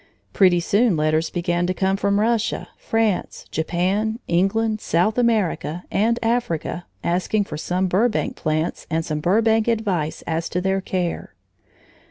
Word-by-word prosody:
Pretty 180 -3 +5
soon 205 +2 +2
letters 155 +1 +1
began 175 0 -1
to 185 - -1
come 190 +1 +1
from 200 +1 +1
Russia, 225 0 0
France, 225 -4 -1
Japan, 190 +7 0
England, 215 +5 +1
South 180 +6 +1
America, 205 -8 0
and 230 +3 +2
Africa, 225 -7 -1 0.2
asking 185 +4 +1
for 195 - -7
some 180 +4 -1
Burbank 210 +6 +1
plants 155 +1 -2
and 160 +1 -1
some 155 -1 -2
Burbank 220 +6 +2
advice 200 -9 -1
as 165 0 -2
to 180 - -1
their 190 +1 0
care. 180 -2 -3
190 Hz, 140 wpm, -22 LUFS, 170-220 Hz, 0.2 s, Pretty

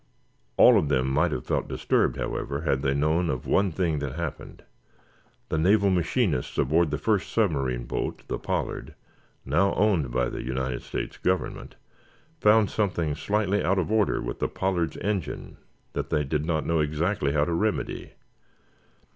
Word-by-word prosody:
All - - +8
of 75 - -1
them 65 -2 +2
might 65 - +2
have 60 - -3
felt - - -1
disturbed, - - +1
however, 70 +1 -3
had 70 -5 0
they 70 -1 +1
known 80 +4 +1
of 60 - -3
one 100 -1 +2
thing 80 -3 0
that 70 -3 -4
happened. 85 -2 -6 0.9
The 80 - 0
naval 100 +4 +4
machinists 90 - 0
aboard 80 +4 +3
the 75 - -1
first 105 -4 0
submarine 70 - 0
boat, - - -4
the - - -3
"Pollard," - - -3 0.5
now 85 +9 +2
owned 95 -11 +2
by 60 0 0
the - - -5
United 65 -1 -3
States - - -5
Government, 95 0 -2 0.6
found 105 -2 +4
something 85 -7 0
slightly 100 +6 0
out 95 +3 +2
of 95 +2 -1
order 110 -2 +2
with - - -5
the - - 0
"Pollard's" 90 -5 -1
engine 100 -7 -3 0.4
that - - -3
they 75 - +1
did 75 +2 -2
not 80 -2 0
know 85 -1 +1
exactly 75 0 0
how 75 -1 +2
to 85 - -2
remedy. 105 +6 -2
80 Hz, 165 wpm, -26 LUFS, 70-95 Hz, 0.9 s, All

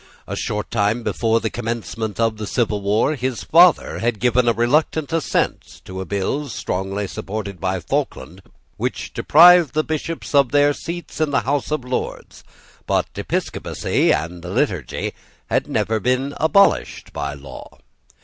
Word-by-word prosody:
A - - -5
short 105 0 -3
time 110 +1 +1
before 115 0 +1
the 110 - -3
commencement 115 -2 -4
of 115 -1 +1
the 105 -1 -5
civil 105 -4 0
war, 105 +8 +2
his 130 -4 -3
father 175 +2 +4
had 115 -2 -1
given 125 0 +2
a - - +6
reluctant 145 +7 +1
assent 165 -2 -1
to 95 0 -6
a - - -5
bill, 100 - -2
strongly 95 -1 -3
supported 100 -1 -6
by 95 0 -1
Falkland, 85 +1 -3 0.4
which - - -3
deprived 170 -2 +6
the 155 - +2
Bishops 160 +1 -4
of 140 -3 +4
their 145 0 +4
seats 170 +3 -6
in 155 - +2
the 140 - +1
House 140 +1 -1
of 150 -4 -2
Lords: 125 0 -5 0.4
but - - +1
Episcopacy - - -1
and 85 +2 -2
the 90 - -8
Liturgy 95 - -1 0.4
had - - +1
never 110 0 0
been 130 +4 0
abolished 160 +6 +2
by 70 -1 -3
law. 70 -2 -11
115 Hz, 155 wpm, -21 LUFS, 100-145 Hz, 0.4 s, a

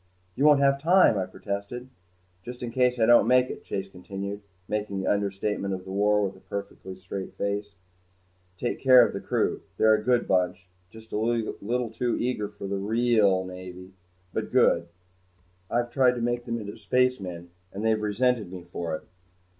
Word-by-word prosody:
"You 140 - +1
won't 145 -2 +6
have 140 0 +3
time," 175 - +5
I 95 - -2
protested. 100 +6 -5 0.6
"Just 125 0 -8
in 120 - -4
case 125 0 +2
I 110 - +5
don't 120 +1 +6
make 125 0 +4
it," - - -9
Chase 95 0 -4
continued, 100 +2 -7 0.3
making 105 -2 -2
the 95 - -3
understatement 100 -1 -1
of 90 - -9
the 95 - -7
war 105 +1 +2
with 95 0 -5
a - - -16
perfectly 95 -1 -7
straight 95 +1 -7
face, 100 0 -3 0.8
"take 120 - -2
care 130 -2 +8
of - - -4
the - - -3
crew. - - -1 0.2
They're 110 0 +5
a 110 - +2
good 125 +1 +2
bunch 90 -1 +1 0.2
just 110 +1 -14
a 115 +1 0
bit 120 +1 -2
too 120 +1 -1
eager 120 -4 -1
for 100 -1 -9
the 100 0 -2
real 105 -3 +2
Navy 90 0 -9 0.4
but - - -3
good. 85 - +3 0.8
I've 120 0 0
tried 125 -1 +3
to 120 - -4
make 120 0 -1
them 115 -1 -2
into 100 -1 -7
spacemen 95 -10 0 0.2
and 100 +3 -5
they've 110 -1 +2
resented 105 -1 0
me 90 -2 -8
for 85 -2 -4
it. - - -8
105 Hz, 180 wpm, -26 LUFS, 95-120 Hz, 0.8 s, care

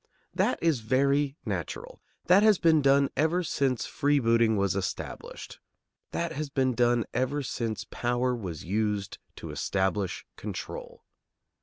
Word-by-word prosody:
That - - +1
is 160 -6 +3
very 140 +5 +1
natural. - - -5 0.2
That 185 +3 +6
has 215 -2 +5
been 160 -3 +4
done 140 0 +4
ever 165 +4 +2
since 135 -6 0
freebooting 115 -6 +2
was 100 -1 +1
established. 95 -3 -5 0.5
That - - -2
has 150 +1 -4
been 130 -2 +1
done 120 -1 +2
ever 130 +4 0
since 115 -3 -3
power 125 +1 0
was 90 -9 -6
used 105 0 -1 0.2
to - - -7
establish 95 -1 -1
control. - - -7
125 Hz, 130 wpm, -28 LUFS, 110-145 Hz, 0.5 s, That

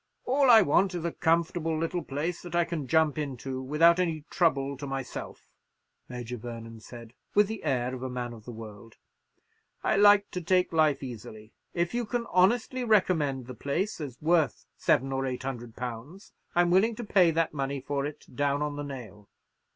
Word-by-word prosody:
"All 270 +1 +3
I 225 -3 +9
want 185 +4 +2
is 170 -1 -4
a 170 - 0
comfortable 165 0 0
little 165 +1 -2
place 155 +5 -3
that 175 -1 -7
I 175 -1 +3
can 165 -5 -4
jump 155 +1 +2
into 135 -2 -4
without 165 +6 +4
any 160 -4 -1
trouble 140 -5 +1
to 140 +1 -6
myself," 135 -2 -6 0.6
Major 125 -1 -6
Vernon 115 -1 -8
said, 115 +1 -11 0.2
with 205 0 +5
the 220 0 -6
air 130 -4 0
of 130 - -6
a 130 - -3
man 125 -1 -4
of 110 -2 -12
the 125 - -7
world. 110 -1 -11 0.9
"I - - +2
like 205 0 +6
to 180 - -4
take 180 +1 +2
life 155 -3 +3
easily. 110 -3 -9 0.2
If 170 +3 0
you 240 -2 -1
can 240 +1 -2
honestly 235 +7 +2
recommend 165 - +2
the 130 - -8
place 160 - -2
as 135 -5 -7
worth 160 -1 +1
seven 135 +2 +1
or 135 0 -1
eight 125 0 -4
hundred 120 -4 -6
pounds, 125 - -7 0.2
I'm 175 0 +4
willing 215 +5 +4
to 240 - -6
pay 195 -5 +4
that 165 0 0
money 140 -1 -2
for 140 +1 -2
it 145 +1 -6
down 145 +1 +1
on 145 -1 -3
the 145 - -3
nail. 120 -7 -9
150 Hz, 190 wpm, -28 LUFS, 130-175 Hz, 0.9 s, I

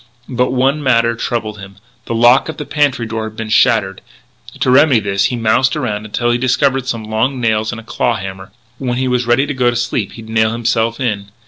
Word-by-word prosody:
But 125 0 0
one 135 +4 +1
matter 115 -4 +2
troubled 110 -3 -3
him: 100 0 -11 0.3
the 115 - -3
lock 120 +6 +4
of 160 - -6
the 150 - -5
pantry 145 -6 0
door 110 0 -4
had 110 0 -8
been 115 -1 -5
shattered. 110 -5 +2 0.6
To 130 - +2
remedy 140 -2 +5
this 100 -1 0
he 125 - 0
moused 120 +4 +2
around 110 -8 -3
until 120 +3 -1
he 120 - 0
discovered 130 +1 +1
some 115 -3 -3
long 110 +5 -1
nails 110 -2 0
and 115 - -6
a - - -11
claw 115 +1 -1
hammer. 95 -1 -7 0.3
When 125 -2 -2
he 130 0 0
was 125 -1 0
ready 120 +4 +3
to 145 - -3
go 125 -2 +2
to 120 - -2
sleep 120 -3 -2
he'd 115 -1 -11
nail 110 0 +1
himself 115 0 0
in. 105 -6 -2
120 Hz, 220 wpm, -16 LUFS, 110-130 Hz, 0.6 s, remedy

